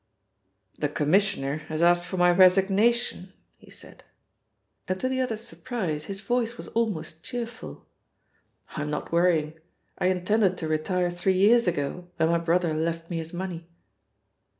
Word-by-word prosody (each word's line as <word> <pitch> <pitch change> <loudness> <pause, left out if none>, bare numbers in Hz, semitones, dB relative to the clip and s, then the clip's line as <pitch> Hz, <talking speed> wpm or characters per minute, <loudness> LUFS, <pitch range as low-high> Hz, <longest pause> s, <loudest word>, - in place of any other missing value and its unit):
"The 145 - 0
Commissioner, 150 -2 +1
has 155 +1 -1
asked 175 0 +4
for 185 - -4
my 175 0 +5
resignation," 195 +3 +3 0.3
he - - -18
said, - - -15 0.8
and 185 0 -2
to 255 - -1
the 260 0 -1
other's 225 -3 -2
surprise, 180 -12 -4
his 195 0 -6
voice 240 0 -1
was - - -8
almost 195 -8 -2
cheerful. 240 -1 -7 0.8
"I'm 150 -1 -4
not 150 - -4
worrying. 165 -2 +1 0.4
I 180 - +2
intended 185 +1 +1
to 160 - -4
retire 175 +3 0
three 185 +2 0
years 225 +3 +5
ago 170 +1 -2
when 160 - +2
my 170 0 +2
brother 170 0 +1
left 165 +2 -3
me 170 - -2
his 165 0 -5
money." 175 -2 -6
180 Hz, 150 wpm, -26 LUFS, 165-205 Hz, 0.8 s, my